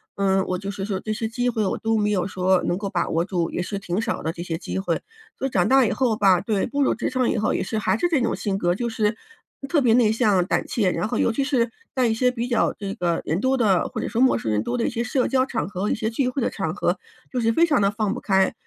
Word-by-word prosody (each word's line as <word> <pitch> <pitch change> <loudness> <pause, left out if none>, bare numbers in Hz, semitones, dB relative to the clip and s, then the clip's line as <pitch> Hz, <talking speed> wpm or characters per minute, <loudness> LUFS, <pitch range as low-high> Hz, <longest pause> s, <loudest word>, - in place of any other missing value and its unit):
嗯， 195 -1 +2
我 185 - -1
就 200 +1 -5
是 195 -1 -5
说 195 -3 -2
这 215 +1 -3
些 220 +1 -2
机 245 +2 -1
会， 220 -2 -1
我 190 - -1
都 225 -1 0
没 210 0 +1
有 185 -4 +1
说 185 0 +1
能 - - 0
够 200 -2 -3
把 175 -3 -1
握 165 +1 +1
住， 175 -3 -2
也 - - -2
是 200 +3 -4
挺 195 +1 -2
少 - - -3
的 160 - -1
这 170 - -8
些 170 -2 -3
机 190 - -4
会。 175 -4 -1 0.4
所 270 - -1
以 270 - -8
长 180 -2 +2
大 265 -1 +5
以 - - 0
后 235 -5 +1
吧， 190 -3 +4
对， 205 0 0
步 285 +3 -2
入 - - +2
职 - - -2
场 255 -1 +1
以 - - 0
后 215 - +1
也 - - -1
是 220 - -3
还 195 -2 +1
是 350 - +1
这 295 -7 +2
种 - - 0
性 200 -3 -2
格， 175 0 +1
就 235 +4 -2
是， 220 -2 +1 0.5
嗯， 275 - -6
特 300 -1 +2
别 235 -2 +4
内 230 -4 +4
向、 210 -6 +2
胆 - - 0
怯， 200 -6 +1
然 210 - -1
后 240 - -2
尤 - - +2
其 275 - 0
是 245 -5 +1 0.2
在 255 - +2
一 225 - +2
些 250 +2 +2
比 240 -1 -3
较 240 -2 +2
这 200 -1 -5
个 170 -2 -1
人 160 +4 0
多 260 +4 +1
的， 200 -7 +2
或 - - -5
者 - - -2
说 235 +2 -1
陌 260 - +4
生 110 - -3
人 105 - +1
多 245 - -2
的 235 - 0
一 - - 0
些 235 - -2
社 255 +1 0
交 260 -1 +2
场 245 -3 -2
合， 200 +1 -3
一 - - +1
些 220 - -2
聚 255 +2 0
会 265 - -3
的 245 - 0
场 175 -4 -3
合， 180 -2 0 0.3
就 250 - -1
是 225 0 +2
非 335 +9 +4
常 295 -10 +2
地 195 - +3
放 210 0 -1
不 245 - -5
开。 190 -1 +2
215 Hz, 330 characters per minute, -23 LUFS, 190-245 Hz, 0.5 s, 大